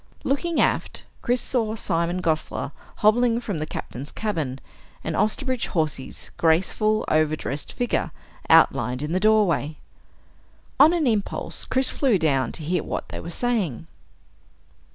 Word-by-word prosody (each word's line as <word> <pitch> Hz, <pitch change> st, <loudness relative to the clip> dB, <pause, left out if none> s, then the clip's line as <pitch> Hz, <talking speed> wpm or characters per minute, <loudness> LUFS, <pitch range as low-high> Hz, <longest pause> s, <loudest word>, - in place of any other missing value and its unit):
Looking 320 Hz, +5 st, 0 dB
aft, -, -, 0 dB, 0.2 s
Chris 245 Hz, 0 st, +1 dB
saw 225 Hz, -4 st, -1 dB
Simon 175 Hz, -2 st, -1 dB
Gosler 155 Hz, -3 st, -1 dB, 0.3 s
hobbling 235 Hz, +2 st, +4 dB
from 205 Hz, -9 st, -4 dB
the 155 Hz, -, -3 dB
Captain's 140 Hz, 0 st, -6 dB
cabin, 160 Hz, -12 st, -2 dB, 0.5 s
and -, -, -2 dB
Osterbridge 255 Hz, +3 st, 0 dB
Hawsey's 155 Hz, -6 st, -3 dB
graceful, 190 Hz, +6 st, +2 dB
overdressed 155 Hz, -2 st, 0 dB
figure 245 Hz, -1 st, -1 dB, 0.4 s
outlined 125 Hz, +4 st, +4 dB
in 150 Hz, -, -3 dB
the 185 Hz, -, +1 dB
doorway. 190 Hz, -8 st, +2 dB, 1.0 s
On 295 Hz, +4 st, +8 dB
an 340 Hz, -3 st, +1 dB
impulse, 215 Hz, -5 st, -1 dB
Chris 260 Hz, 0 st, 0 dB
flew 255 Hz, -8 st, +2 dB
down 135 Hz, -7 st, +1 dB
to 160 Hz, -, -6 dB
hear 170 Hz, +2 st, 0 dB
what -, -, -4 dB
they -, -, -6 dB
were 170 Hz, -, -7 dB
saving. 185 Hz, -, -1 dB
185 Hz, 130 wpm, -24 LUFS, 155-235 Hz, 1.0 s, On